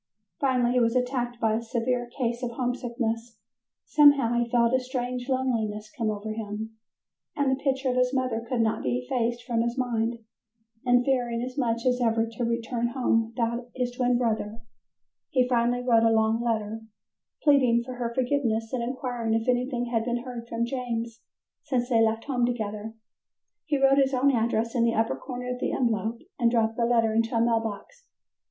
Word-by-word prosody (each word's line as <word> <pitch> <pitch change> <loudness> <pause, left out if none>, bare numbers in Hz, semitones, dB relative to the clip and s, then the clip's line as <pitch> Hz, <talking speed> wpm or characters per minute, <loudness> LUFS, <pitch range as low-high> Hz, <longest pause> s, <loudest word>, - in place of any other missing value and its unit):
Finally 250 -3 +2
he 250 - +3
was 230 0 +2
attacked 245 -1 -1
by 225 -2 +2
a 225 - 0
severe 240 +1 -1
case 240 -2 -1
of 245 - -2
homesickness; 235 -2 -3 0.5
somehow 285 -5 +5
he 240 0 0
felt 235 0 +3
a 260 - +4
strange 250 0 -4
loneliness 220 -5 -1
come 225 -2 -1
over 215 +1 -3
him, 215 0 -5 0.6
and 285 -2 +1
the 265 +1 -2
picture 270 -1 0
of - - -2
his 250 0 +2
mother 255 -4 -1
could 250 -3 +1
not 220 -1 0
be 125 -1 0
effaced 235 - -2
from 235 -2 0
his 235 +2 -1
mind, 235 -2 0 0.7
and 245 0 +3
fearing 245 -3 0
as 255 0 -5
much 235 -4 -1
as 250 0 +2
ever 225 -1 +2
to 230 +1 -5
return 235 +1 -1
home 230 -3 +2
without 235 +1 -2
his 250 -1 -1
twin 245 0 +1
brother, 225 -2 -1 0.7
he 255 -2 +2
finally 245 0 +1
wrote 235 -2 +4
a 225 - +4
long 220 +1 +2
letter, 225 -2 -2 0.6
pleading 255 -5 +4
for 255 +1 -7
her 235 -1 -2
forgiveness 240 -3 0
and 250 - 0
inquiring 240 -2 -2
if 225 +2 -1
anything 250 0 0
had 225 -1 +2
been 240 0 -2
heard 245 -2 -7
from 235 0 -1
James 235 -2 -4 0.4
since 250 -3 -1
they 230 -3 +4
left 225 0 +1
home 255 -4 -1
together. 220 -2 -2 0.7
He 300 -3 +1
wrote 270 0 +4
his 270 -1 +2
own 275 +2 +4
address 230 -1 0
in 240 -3 +2
the 230 0 +2
upper 225 +1 +1
corner 250 -1 -5
of 250 - -7
the - - -1
envelope 230 -2 -1 0.2
and 235 -1 +4
dropped 225 -1 +1
the 235 - +2
letter 230 -2 +2
into 225 +1 +1
a - - +3
mail 230 0 +3
box. 225 - -7
240 Hz, 185 wpm, -26 LUFS, 225-250 Hz, 0.7 s, somehow